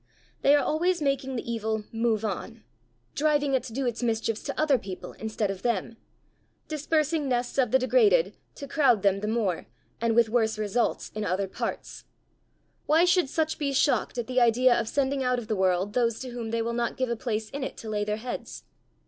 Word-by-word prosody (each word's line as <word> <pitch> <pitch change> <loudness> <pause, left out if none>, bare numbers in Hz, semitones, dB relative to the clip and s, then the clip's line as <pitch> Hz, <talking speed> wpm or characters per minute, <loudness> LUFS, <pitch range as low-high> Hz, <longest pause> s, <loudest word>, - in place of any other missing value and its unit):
They 280 +1 +6
are 290 - +3
always 350 +3 +1
making 275 -2 -1
the 235 - -4
evil 220 -2 -2
"move 225 -1 0
on," 220 +3 -5 0.5
driving 295 -2 +1
it 260 - +3
to - - -8
do 265 +4 -2
its 240 -1 -2
mischiefs 225 -2 -1
to 280 - -4
other 290 -5 +3
people 190 -3 -7
instead 215 -2 -2
of 190 -1 -7
them; 230 0 -1 0.7
dispersing 305 -1 0
nests 245 +1 -1
of 250 -3 +3
the 260 - +5
degraded 450 - +3 0.2
to 280 - -8
crowd 255 -9 +3
them 195 -1 +3
the 210 - -3
more, 215 -6 -1 0.3
and 230 -1 +1
with 235 -1 +5
worse 220 -1 +1
results, 215 +3 -1
in 215 - -3
other 190 0 -1
parts: - - -5 0.8
why 320 +4 +5
should 355 -4 +3
such 315 +1 -1
be 280 -2 -1
shocked 275 -1 +1
at 240 - -1
the 255 +1 +1
idea 240 +2 +5
of 230 -2 0
sending 275 -1 0
out 250 -1 +1
of 235 -3 -5
the 215 - 0
world 190 +1 +1
those 235 -2 +1
to 260 - -5
whom 235 -2 -5
they 230 0 -1
will 235 +1 -2
not 235 0 -1
give 255 -1 0
a 235 - 0
place 220 -2 -3
in 280 -1 -4
it - - -5
to 225 - -9
lay 210 -1 -1
their 210 0 -2
heads? 240 +3 -6
240 Hz, 210 wpm, -27 LUFS, 220-275 Hz, 0.8 s, They